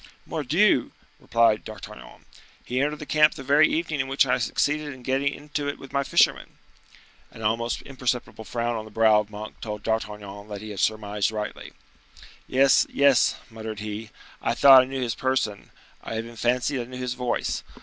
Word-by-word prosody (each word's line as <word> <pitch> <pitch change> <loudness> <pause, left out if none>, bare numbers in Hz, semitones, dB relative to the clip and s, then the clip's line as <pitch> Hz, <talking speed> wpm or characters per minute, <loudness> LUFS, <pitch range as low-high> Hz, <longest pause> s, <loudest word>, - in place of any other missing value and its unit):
"Mordioux!" - - +2 0.3
replied 115 -2 +2
D'Artagnan, 110 -2 -11 0.4
"he 125 +2 -1
entered 150 +2 0
the 150 - -8
camp 150 +1 +4
the 135 - -8
very 145 +3 +5
evening 160 -2 -1
in 130 - -1
which 135 +1 +3
I 125 -1 +1
succeeded 145 +4 -1
in 130 - -15
getting 135 +2 0
into 145 0 -5
it 145 - -5
with 135 - -13
my 140 0 +1
fishermen—" - - +2 0.7
An 115 - -11
almost 115 +2 -1
imperceptible 125 -4 -3
frown 120 +1 -2
on 110 -1 -5
the - - -11
brow 110 0 +4
of 105 -1 -4
Monk 105 +1 -9
told 105 -2 -6
D'Artagnan 105 -2 -4
that 105 -1 -7
he 110 0 -7
had 100 - -7
surmised 105 -1 0
rightly. 105 -1 -6 0.7
"Yes, 135 +1 +4
yes," 140 -3 +4 0.2
muttered 110 -1 -7
he; 105 +1 -6 0.3
"I - - 0
thought 135 -2 +9
I - - -1
knew 130 0 -3
his 120 -2 -1
person; 130 -6 -2 0.3
I 115 - -5
even 115 +1 -6
fancied 125 +3 0
I - - -6
knew 125 +1 -9
his 125 -1 -3
voice. 125 -1 -2
120 Hz, 180 wpm, -25 LUFS, 110-135 Hz, 0.7 s, thought